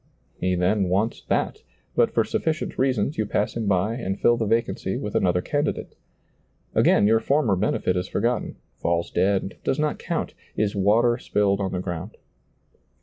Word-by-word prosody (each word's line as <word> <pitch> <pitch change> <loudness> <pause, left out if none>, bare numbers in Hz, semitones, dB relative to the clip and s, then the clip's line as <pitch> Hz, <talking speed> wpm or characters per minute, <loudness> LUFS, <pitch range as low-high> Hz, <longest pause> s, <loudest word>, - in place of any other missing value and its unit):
He 90 0 +1
then 95 +2 +1
wants 105 +5 0
that, - - -1 0.3
but - - +4
for - - +2
sufficient 160 +1 -2
reasons 130 -1 +1
you 110 - 0
pass 105 - -1
him 115 -3 -2
by 100 +3 +2
and 100 -5 -3
fill 120 - +4
the 115 -2 -1
vacancy 115 +2 0
with - - -4
another 90 -1 +2
candidate. 145 0 -2 0.8
Again - - +4
your 110 +2 +4
former 135 -6 +2
benefit 90 -1 0
is 90 +1 -1
forgotten, 120 +4 -1 0.3
&lls 85 0 0
dead, 95 +1 +1
does 135 - 0
not 150 0 -1
count, - - -3 0.2
is 105 -1 0
water 115 +5 +3
spilled 100 -4 +1
on 95 - -1
the 90 - -2
ground. 90 +3 -6
105 Hz, 165 wpm, -24 LUFS, 95-115 Hz, 0.8 s, but